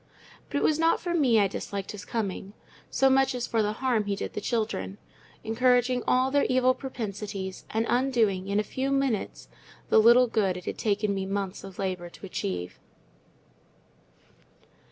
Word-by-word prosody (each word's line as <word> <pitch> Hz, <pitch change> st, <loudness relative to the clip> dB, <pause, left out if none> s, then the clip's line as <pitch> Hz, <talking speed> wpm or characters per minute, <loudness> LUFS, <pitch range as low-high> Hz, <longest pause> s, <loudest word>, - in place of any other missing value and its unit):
But -, -, -2 dB
it -, -, 0 dB
was 310 Hz, 0 st, +2 dB
not 330 Hz, 0 st, +3 dB
for 345 Hz, -1 st, -3 dB
that 275 Hz, -8 st, +3 dB
I 200 Hz, -, +4 dB
disliked 195 Hz, 0 st, -5 dB
his 205 Hz, -1 st, -9 dB
coming, 200 Hz, -3 st, -4 dB, 0.4 s
so 270 Hz, -, +3 dB
much 270 Hz, -1 st, +3 dB
as 245 Hz, -1 st, -2 dB
for 225 Hz, -, 0 dB
the 210 Hz, 0 st, 0 dB
harm 235 Hz, -3 st, 0 dB
he 200 Hz, 0 st, -1 dB
did -, -, -5 dB
the -, -, -4 dB
children—encouraging 225 Hz, -, -1 dB
all 255 Hz, +1 st, +3 dB
their 285 Hz, 0 st, +3 dB
evil 255 Hz, 0 st, +4 dB
propensities, 205 Hz, -7 st, -6 dB
and 225 Hz, +1 st, 0 dB
undoing 230 Hz, -7 st, +1 dB
in 200 Hz, +1 st, +1 dB
a -, -, +1 dB
few 260 Hz, +5 st, -3 dB
minutes 275 Hz, -6 st, -1 dB, 0.4 s
the -, -, +6 dB
little 235 Hz, +3 st, +7 dB
good 205 Hz, -6 st, 0 dB
it 180 Hz, -, -9 dB
had -, -, -5 dB
taken 210 Hz, -1 st, 0 dB
me 190 Hz, -1 st, -3 dB
months 195 Hz, -1 st, -3 dB
of 195 Hz, -2 st, -10 dB
labour 185 Hz, -3 st, -3 dB
to 185 Hz, -, -12 dB
achieve. 90 Hz, -, -4 dB
220 Hz, 170 wpm, -27 LUFS, 195-255 Hz, 0.4 s, little